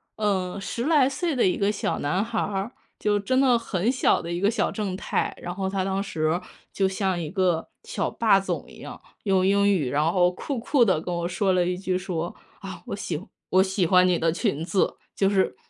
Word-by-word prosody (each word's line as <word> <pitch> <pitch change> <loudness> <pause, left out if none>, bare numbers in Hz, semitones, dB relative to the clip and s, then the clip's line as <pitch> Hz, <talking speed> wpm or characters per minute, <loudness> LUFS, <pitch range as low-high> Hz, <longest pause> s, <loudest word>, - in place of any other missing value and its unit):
呃， 190 -4 -1
10 235 +5 -4
来 300 -5 +4
岁 295 +3 -1
的 245 - +3
一 180 - +2
个 200 +1 +1
小 205 - -2
男 180 +9 0
孩 225 -1 -2
儿， 200 +3 -2 0.3
就 205 -1 +1
真 255 +6 +1
的 250 -3 +4
很 205 +1 0
小 255 - +2
的 170 - -5
一 175 - -2
个 200 +3 +3
小 235 - 0
正 195 -4 -3
太， - - -2
然 175 - -5
后 190 -1 -2
他 190 -1 -1
当 195 0 -1
时 160 -3 -1 0.3
就 195 -1 +1
像 190 -2 -1
一 155 - -4
个 180 -2 0
小 - - -2
霸 215 -4 +3
总 195 - -3
一 - - -14
样， - - -9 0.3
用 190 -2 +3
英 200 +1 +4
语， 150 -10 0
然 150 +3 +2
后 180 -1 +4
酷 265 +9 -4
酷 240 +2 +3
地 185 -7 +2
跟 175 +2 -4
我 170 0 -1
说 190 +2 +1
了 180 -1 +2
一 180 0 -1
句 185 -1 -2
说： 175 -2 -3 0.3
“啊， 185 -3 -8
我 - - -3
喜 175 -4 -4 0.3
我 190 0 +5
喜 190 -1 0
欢 180 +2 +5
你 180 -2 +2
的 165 0 +2
裙 175 - -1
子。” 190 +1 +1 0.2
就 195 - +2
是 190 -9 +1
190 Hz, 235 characters per minute, -25 LUFS, 180-205 Hz, 0.3 s, 我